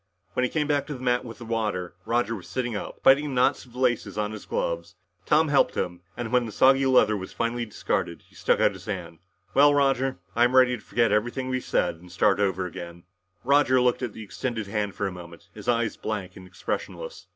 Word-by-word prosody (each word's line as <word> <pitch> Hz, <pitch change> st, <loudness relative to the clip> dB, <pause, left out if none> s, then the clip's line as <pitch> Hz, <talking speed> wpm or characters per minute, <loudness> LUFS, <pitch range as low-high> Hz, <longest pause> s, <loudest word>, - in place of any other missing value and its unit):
When 125 Hz, -, 0 dB
he 125 Hz, -, +1 dB
came 150 Hz, -2 st, 0 dB
back 145 Hz, -1 st, 0 dB
to 150 Hz, -, -4 dB
the -, -, -9 dB
mat 125 Hz, -1 st, +1 dB
with 115 Hz, -2 st, -9 dB
the 120 Hz, -, -9 dB
water, 105 Hz, -6 st, -2 dB
Roger 115 Hz, -1 st, +1 dB
was 95 Hz, -, -10 dB
sitting 125 Hz, -3 st, -2 dB
up, -, -, -6 dB
biting 135 Hz, +3 st, +6 dB
the 140 Hz, -3 st, -4 dB
knots 125 Hz, -, +2 dB
of 120 Hz, -, -19 dB
the -, -, -12 dB
laces 125 Hz, -4 st, 0 dB
on 105 Hz, 0 st, -1 dB
his 110 Hz, -1 st, -9 dB
gloves. 85 Hz, +1 st, -2 dB, 0.3 s
Tom 155 Hz, +1 st, +4 dB
helped 145 Hz, -, +3 dB
him, 90 Hz, 0 st, -2 dB, 0.2 s
and 120 Hz, -2 st, -4 dB
when 125 Hz, -2 st, +2 dB
the -, -, -6 dB
soggy 135 Hz, +3 st, +4 dB
leather 125 Hz, -5 st, +4 dB
was 95 Hz, -2 st, -6 dB
finally 115 Hz, 0 st, -2 dB
discarded, 105 Hz, -, -2 dB
he -, -, -26 dB
stuck -, -, +1 dB
out -, -, +4 dB
his 95 Hz, -1 st, -12 dB
hand. 90 Hz, -6 st, -5 dB, 0.3 s
"Well, 145 Hz, +1 st, +6 dB
Roger, 135 Hz, -3 st, +2 dB, 0.2 s
I'm 120 Hz, +2 st, +3 dB
ready 130 Hz, -1 st, +6 dB
to 115 Hz, -, -11 dB
forget 115 Hz, 0 st, +1 dB
everything 120 Hz, +5 st, 0 dB
we've 130 Hz, -1 st, -1 dB
said -, -, 0 dB
and 90 Hz, +1 st, -15 dB
start 95 Hz, +2 st, +2 dB
all 100 Hz, -, +4 dB
over 95 Hz, -1 st, -2 dB
again." 85 Hz, 0 st, -8 dB, 0.4 s
Roger 135 Hz, -1 st, +4 dB
looked 125 Hz, 0 st, +2 dB
at 120 Hz, -5 st, -3 dB
the 110 Hz, -, -8 dB
extended 110 Hz, +3 st, -4 dB
hand 105 Hz, 0 st, -2 dB
for 100 Hz, -, -2 dB
a 95 Hz, -, -1 dB
moment, 85 Hz, -2 st, -11 dB
his 105 Hz, -2 st, -11 dB
eyes 115 Hz, -2 st, +1 dB
blank 100 Hz, -4 st, -4 dB
and 95 Hz, -1 st, -11 dB
expressionless. -, -, -5 dB
115 Hz, 230 wpm, -26 LUFS, 100-130 Hz, 0.4 s, biting